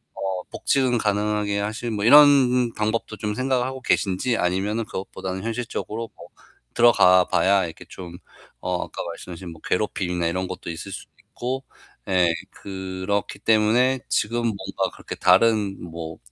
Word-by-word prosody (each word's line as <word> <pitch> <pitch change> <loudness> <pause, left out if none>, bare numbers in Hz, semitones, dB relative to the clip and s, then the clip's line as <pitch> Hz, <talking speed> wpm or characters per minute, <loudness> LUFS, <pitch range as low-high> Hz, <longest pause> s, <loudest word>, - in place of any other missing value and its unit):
어 95 -2 -3
복직을 130 -3 +1
가능하게 105 -1 0
하실 110 +3 -3
뭐 105 -1 -2
이런 125 -3 +6
방법도 110 +2 -2
좀 105 -1 -3
생각을 130 -1 +1
하고 130 0 -6
계신지 115 +2 +1
아니면은 100 +5 0
그것보다는 95 -1 -6
현실적으로 115 -1 -4
뭐 85 +1 -13 0.4
들어가 95 -6 +6
봐야 95 -1 +3
이렇게 80 - -9
좀 90 -2 -9 0.4
어 90 -1 -1
아까 - - -6
말씀하신 90 +1 -9
뭐 80 - -16
괴롭힘이나 90 -3 -1
이런 95 +2 -2
것도 - - -7
있을 90 +4 -7
수도 - - -9 0.2
있고 130 +2 -4 0.5
예 90 -2 +4 0.2
그렇기 95 +1 -4
때문에 115 +5 +3
지금 115 +3 0
뭔가 110 -4 -2
그렇게 - - -8
다른 110 -4 +3
뭐 80 -1 -7
105 Hz, 325 characters per minute, -23 LUFS, 95-115 Hz, 0.5 s, 이런